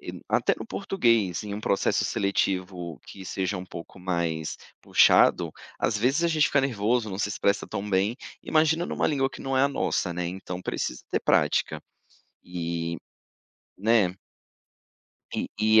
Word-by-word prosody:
e -, -, -8 dB
até -, -, +2 dB
no -, -, -7 dB
português, 115 Hz, -, +1 dB
em 100 Hz, -1 st, -4 dB
um 105 Hz, -, -5 dB
processo 100 Hz, -2 st, +1 dB
seletivo 90 Hz, -4 st, -1 dB
que 95 Hz, -, -10 dB
seja 95 Hz, +1 st, -2 dB
um 90 Hz, -, -5 dB
pouco 85 Hz, +1 st, -10 dB
mais 85 Hz, -3 st, -2 dB, 0.3 s
puxado, -, -, +5 dB, 0.3 s
às 110 Hz, -, +1 dB
vezes 130 Hz, +9 st, +2 dB
a 170 Hz, -, +3 dB
gente 155 Hz, -2 st, +3 dB
fica 140 Hz, -, +3 dB
nervoso, 120 Hz, -2 st, +1 dB
não 95 Hz, -1 st, -5 dB
se 105 Hz, -, 0 dB
expressa 100 Hz, 0 st, 0 dB
tão 100 Hz, +1 st, -4 dB
bem, 100 Hz, +3 st, +2 dB, 0.3 s
imagina 160 Hz, +2 st, +2 dB
numa -, -, 0 dB
língua 135 Hz, -3 st, +1 dB
que -, -, -10 dB
não 135 Hz, -1 st, -1 dB
é 130 Hz, -, +4 dB
a 140 Hz, -, +4 dB
nossa, 95 Hz, -9 st, -1 dB
né, 90 Hz, 0 st, -2 dB
então 90 Hz, 0 st, -5 dB
precisa -, -, -3 dB
ter -, -, +1 dB
prática. -, -, +2 dB, 0.6 s
E 85 Hz, -1 st, -3 dB, 0.8 s
né. 105 Hz, -3 st, +3 dB, 1.2 s
E -, -, -2 dB
e 110 Hz, +1 st, +6 dB
100 Hz, 160 wpm, -26 LUFS, 90-125 Hz, 1.2 s, e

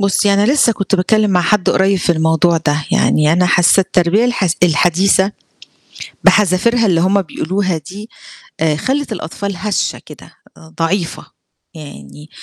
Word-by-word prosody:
بُصّي 200 Hz, 0 st, +1 dB
أنا 205 Hz, +7 st, +2 dB
لسه 265 Hz, -5 st, +3 dB
كنت 200 Hz, -1 st, -3 dB
باتكلّم 210 Hz, +3 st, +1 dB
مع 180 Hz, -2 st, +2 dB
حد 185 Hz, +2 st, +1 dB
قريب 195 Hz, 0 st, +1 dB
في 175 Hz, -, 0 dB
الموضوع 160 Hz, +1 st, +1 dB
ده، 145 Hz, 0 st, 0 dB
يعني 150 Hz, 0 st, +2 dB
أنا 180 Hz, +2 st, +2 dB
حاسة 175 Hz, +2 st, +3 dB
التربية 185 Hz, +3 st, +1 dB
الحس 200 Hz, -8 st, -1 dB
الحديثة 180 Hz, +4 st, +2 dB, 0.9 s
بحذافِيرها 215 Hz, +3 st, +2 dB
اللي 175 Hz, -4 st, +1 dB
هُم 195 Hz, +3 st, +1 dB
بيقولوها 185 Hz, +2 st, -3 dB
دي 195 Hz, +8 st, -11 dB, 0.5 s
آآ 155 Hz, -2 st, 0 dB
خلّت 265 Hz, -, -3 dB
الأطفال 200 Hz, +1 st, -6 dB
هشة 205 Hz, +3 st, -3 dB
كده، -, -, -14 dB, 0.2 s
آآ 80 Hz, 0 st, -18 dB
ضعيفة، 170 Hz, +1 st, -3 dB, 0.5 s
يعني 150 Hz, -1 st, -12 dB
185 Hz, 145 wpm, -15 LUFS, 165-205 Hz, 0.9 s, لسه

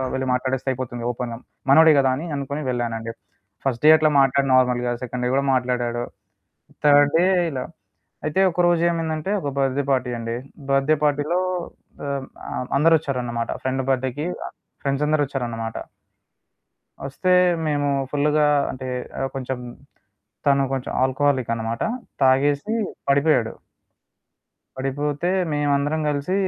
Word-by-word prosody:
వెళ్ళి 130 Hz, -, -2 dB
మాట్లాడేస్తే 130 Hz, +1 st, -2 dB
అయిపోతుంది. 120 Hz, -2 st, -5 dB
ఓపెన్‌గా. 120 Hz, -1 st, -5 dB, 0.3 s
మనోడే 160 Hz, +1 st, +7 dB
కదా! 135 Hz, -1 st, +3 dB
అని 160 Hz, -, -5 dB
అనుకొని 140 Hz, +2 st, -4 dB
వెళ్ళానండి. 115 Hz, -2 st, -2 dB, 0.5 s
ఫస్ట్ 125 Hz, -2 st, -1 dB
డే -, -, +9 dB
అట్లా 155 Hz, -1 st, +3 dB
మాట్లాడ 135 Hz, +1 st, +2 dB
నార్మల్‌గా. 125 Hz, -1 st, +2 dB
సెకండ్ 125 Hz, 0 st, -4 dB
డే 125 Hz, -, +1 dB
కూడా 140 Hz, 0 st, +1 dB
మాట్లాడాడు. 120 Hz, -1 st, 0 dB, 0.8 s
థర్డ్ 145 Hz, 0 st, +6 dB
డే 175 Hz, -, +4 dB, 0.3 s
ఇలా. 130 Hz, -2 st, -3 dB, 0.6 s
అయితే 155 Hz, +4 st, 0 dB
ఒకరోజు 175 Hz, -1 st, +2 dB
ఏమైందంటే 165 Hz, +1 st, -2 dB
ఒక 145 Hz, -, -3 dB
బర్త్దే 135 Hz, +1 st, +1 dB
పార్టీ 130 Hz, -2 st, 0 dB
అండి. 115 Hz, 0 st, -3 dB, 0.4 s
బర్త్దే 135 Hz, +3 st, +3 dB
పార్టీలో 150 Hz, +4 st, +1 dB, 0.7 s
ఆహ్, 140 Hz, -1 st, -3 dB, 0.2 s
ఆహ్, 125 Hz, -, -4 dB
అందరొచ్చారన్నమాట. 135 Hz, -7 st, +1 dB
ఫ్రెండ్ 130 Hz, 0 st, -1 dB
బర్త్డేకి 130 Hz, +2 st, -1 dB, 0.6 s
ఫ్రెండ్స్ 140 Hz, +1 st, -1 dB
అందరూ 155 Hz, -1 st, +2 dB
వచ్చారన్నమాట. 115 Hz, -4 st, -4 dB, 1.3 s
ఒస్తే 185 Hz, +7 st, -2 dB, 0.4 s
మేము 145 Hz, -1 st, 0 dB, 0.2 s
ఫుల్లుగా 150 Hz, +1 st, +2 dB, 0.2 s
అంటే 130 Hz, 0 st, -7 dB, 0.3 s
ఆహ్ 135 Hz, -, -1 dB
కొంచెం 130 Hz, -1 st, -3 dB, 0.9 s
తను 140 Hz, -1 st, +4 dB
కొంచెం 130 Hz, -, -4 dB
ఆల్కోహాలిక్ 130 Hz, -2 st, +1 dB
అనమాట. 115 Hz, +1 st, -4 dB, 0.4 s
తాగేసి 140 Hz, +9 st, +3 dB, 0.4 s
పడిపోయాడు. 140 Hz, -5 st, +3 dB, 1.2 s
పడిపోతే 145 Hz, +4 st, -2 dB, 0.2 s
మేమందరం 145 Hz, +1 st, +1 dB
కలిసి 145 Hz, +5 st, -1 dB
135 Hz, 120 wpm, -22 LUFS, 125-145 Hz, 1.3 s, డే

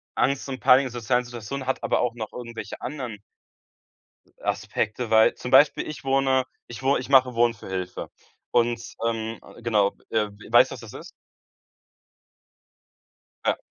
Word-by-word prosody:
Angst 140 Hz, +1 st, +1 dB
und 130 Hz, -1 st, -4 dB
Panik 135 Hz, +1 st, +6 dB
in 130 Hz, -, -5 dB
sozialen 120 Hz, +1 st, 0 dB
Situationen 120 Hz, +3 st, -6 dB
hat 130 Hz, 0 st, -1 dB
aber -, -, +1 dB
auch 125 Hz, -1 st, 0 dB
noch 110 Hz, -3 st, -6 dB
irgendwelche 120 Hz, -2 st, -7 dB
anderen 125 Hz, -7 st, -5 dB, 1.2 s
Aspekte, 110 Hz, +2 st, -2 dB
weil, 110 Hz, 0 st, +5 dB
zum 125 Hz, -, -6 dB
Beispiel 140 Hz, +2 st, +5 dB
ich 155 Hz, -3 st, -7 dB
wohne 135 Hz, -1 st, +2 dB, 0.2 s
ich 120 Hz, +1 st, -9 dB
wo 135 Hz, +1 st, +3 dB
ich 130 Hz, -, -6 dB
mache 130 Hz, -3 st, +5 dB
Wohnen 120 Hz, 0 st, +3 dB
für 110 Hz, -, -12 dB
Hilfe. 95 Hz, -1 st, -4 dB, 0.4 s
Und, 120 Hz, 0 st, +2 dB, 0.3 s
ähm, 115 Hz, 0 st, -3 dB, 0.2 s
genau, 105 Hz, -4 st, +2 dB
äh, 110 Hz, -1 st, +1 dB, 0.2 s
weißt, 120 Hz, -, +6 dB
was -, -, -7 dB
das 115 Hz, -, -11 dB
ist? 170 Hz, +4 st, -10 dB, 2.3 s
Ja, -, -, +2 dB
120 Hz, 150 wpm, -25 LUFS, 115-130 Hz, 2.3 s, Panik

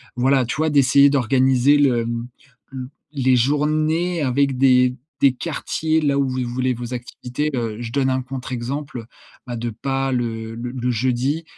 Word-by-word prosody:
voilà, 130 Hz, +1 st, +2 dB
tu 120 Hz, -, -3 dB
vois 155 Hz, +1 st, +1 dB
d'essayer 140 Hz, -1 st, +5 dB
d'organiser 130 Hz, +1 st, +3 dB
le, 130 Hz, -5 st, +3 dB
hem, 115 Hz, +1 st, -4 dB, 0.4 s
le 130 Hz, -1 st, -7 dB, 0.2 s
les 130 Hz, -2 st, +2 dB
journées 155 Hz, +6 st, +1 dB
avec 135 Hz, 0 st, +1 dB
des 125 Hz, -1 st, +4 dB, 0.3 s
des 140 Hz, -2 st, +5 dB
quartiers 160 Hz, +2 st, -1 dB
là 140 Hz, -2 st, +1 dB
où 140 Hz, -, +1 dB
vous 130 Hz, -, -3 dB
les 125 Hz, -, -1 dB
voulez, 125 Hz, +1 st, -1 dB
vos 120 Hz, +1 st, -6 dB
activités. 125 Hz, +4 st, -4 dB
Heu, 115 Hz, -3 st, -2 dB
je 115 Hz, -, -5 dB
donne 135 Hz, +1 st, +1 dB
un 130 Hz, 0 st, 0 dB
contre 130 Hz, 0 st, -7 dB
exemple, 125 Hz, 0 st, -5 dB, 0.4 s
bah 120 Hz, -, -4 dB
de 120 Hz, +1 st, -3 dB
pas 135 Hz, +4 st, -2 dB
le 115 Hz, -2 st, -3 dB
le 120 Hz, +1 st, -5 dB
le 125 Hz, -1 st, -2 dB
jeudi, 130 Hz, +6 st, 0 dB
130 Hz, 175 wpm, -21 LUFS, 120-140 Hz, 0.4 s, d'essayer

